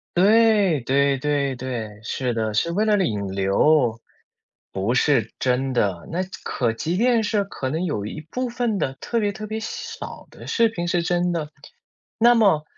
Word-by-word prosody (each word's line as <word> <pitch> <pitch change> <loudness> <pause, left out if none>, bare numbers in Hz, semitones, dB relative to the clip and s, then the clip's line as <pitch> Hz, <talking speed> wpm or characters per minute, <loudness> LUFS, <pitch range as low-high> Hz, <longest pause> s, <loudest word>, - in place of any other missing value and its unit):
对， 205 - +4
对 140 +2 +2
对 140 -1 0
对， 115 -5 -5
是 125 +1 -2
的， 110 -2 -1
是 170 +9 +1
为 210 +5 +1
了 210 -1 +3
引 100 -5 -2
流。 115 +6 +2 0.7
不 100 +5 -1
是， 125 -4 +2
真 130 +1 0
的， 100 -8 0
那 180 +2 -1 0.2
可 120 -3 0
即 165 +10 -2
便 235 +1 +3
是 210 -1 +1
可 135 -9 -5
能 160 +6 -2
有 105 - -2
一 155 +8 -6
部 255 -1 -2
分 235 -3 -1
的 135 -5 -1
特 235 - -1
别 205 -2 0
特 215 +2 -7
别 220 +1 -3
小 225 - -5 0.4
少 - - -11
的 - - -12
视 230 -1 +3
频 175 -5 -4
是 175 0 +1
真 175 0 +1
的， 155 -3 -3 0.7
那 240 +2 +6
么 195 -10 +4
155 Hz, 195 characters per minute, -23 LUFS, 125-210 Hz, 0.7 s, 那